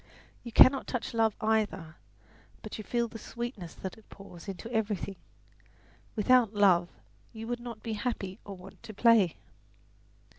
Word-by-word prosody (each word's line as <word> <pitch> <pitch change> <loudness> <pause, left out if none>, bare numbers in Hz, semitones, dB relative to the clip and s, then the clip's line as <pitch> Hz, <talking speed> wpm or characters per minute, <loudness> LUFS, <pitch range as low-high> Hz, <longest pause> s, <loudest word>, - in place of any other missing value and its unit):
You 235 - -7
cannot 260 +4 +7
touch 250 -2 -3
love 225 -2 +2
either; 210 -7 0 0.7
but - - -7
you - - -5
feel 235 +2 0
the 225 0 -9
sweetness 235 -8 -6
that 190 +3 -7
it 220 - -23
pours 195 -2 -12
into 195 +2 -6
everything. 205 -3 -1 1.0
Without 230 0 +4
love 185 -4 +4 0.4
you 225 0 -7
would 240 +1 -3
not 235 -2 -8
be 225 - -3
happy 205 -3 -3
or 200 -2 -8
want 180 +2 -13
to 215 - -10
play." 220 -6 +5
215 Hz, 150 wpm, -30 LUFS, 195-235 Hz, 1.0 s, cannot